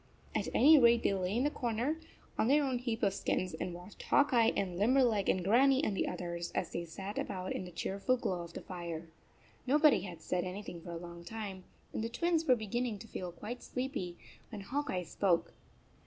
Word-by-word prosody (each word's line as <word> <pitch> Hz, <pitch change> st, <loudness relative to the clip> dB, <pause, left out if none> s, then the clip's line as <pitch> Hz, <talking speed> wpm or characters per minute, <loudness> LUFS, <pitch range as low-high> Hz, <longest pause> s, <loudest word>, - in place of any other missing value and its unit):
At -, -, -1 dB
any 300 Hz, +3 st, +8 dB
rate 235 Hz, -2 st, +5 dB
they -, -, +3 dB
lay 190 Hz, +2 st, -1 dB
in 250 Hz, -, +2 dB
their 295 Hz, -, +2 dB
corner, 245 Hz, +5 st, -1 dB, 0.4 s
on -, -, +1 dB
their 290 Hz, +3 st, +5 dB
own 260 Hz, -3 st, 0 dB
heap 235 Hz, -2 st, -3 dB
of 200 Hz, -2 st, +3 dB
skins 185 Hz, -2 st, -1 dB
and 170 Hz, +3 st, -3 dB
watched 180 Hz, +3 st, -11 dB
Hawk 285 Hz, -2 st, +3 dB
Eye 230 Hz, -1 st, +5 dB
and 185 Hz, -3 st, -1 dB
Limberleg 235 Hz, -2 st, +3 dB
and 185 Hz, -, +2 dB
Grannie 265 Hz, -, +4 dB
and 210 Hz, -, 0 dB
the -, -, 0 dB
others 170 Hz, -1 st, -4 dB
as -, -, -2 dB
they 170 Hz, -, -3 dB
sat 195 Hz, +5 st, -5 dB
about 185 Hz, -2 st, -3 dB
in 185 Hz, -, -4 dB
the 180 Hz, -, -9 dB
cheerful 195 Hz, +8 st, 0 dB
glow 185 Hz, -7 st, -2 dB
of 170 Hz, 0 st, -9 dB
the -, -, -6 dB
fire. 170 Hz, -2 st, -6 dB, 0.6 s
Nobody 295 Hz, -, +5 dB
had 175 Hz, -3 st, -7 dB
said 180 Hz, -1 st, 0 dB
anything 185 Hz, -2 st, -6 dB
for 175 Hz, -, -10 dB
a 170 Hz, -, -4 dB
long 170 Hz, 0 st, -9 dB
time, 195 Hz, -2 st, -6 dB, 0.3 s
and -, -, -2 dB
the 230 Hz, -, -2 dB
Twins 335 Hz, +6 st, +1 dB
39 325 Hz, -, -12 dB
were 255 Hz, -2 st, +6 dB
beginning 225 Hz, +1 st, -2 dB
to 210 Hz, -, -11 dB
feel 180 Hz, -4 st, -5 dB
quite 215 Hz, +8 st, -7 dB
sleepy, 250 Hz, -10 st, -4 dB, 0.3 s
when 215 Hz, -4 st, -7 dB
Hawk 280 Hz, +9 st, -2 dB
Eye 180 Hz, -1 st, -1 dB
spoke. 175 Hz, 0 st, +1 dB
205 Hz, 215 wpm, -33 LUFS, 180-250 Hz, 0.6 s, any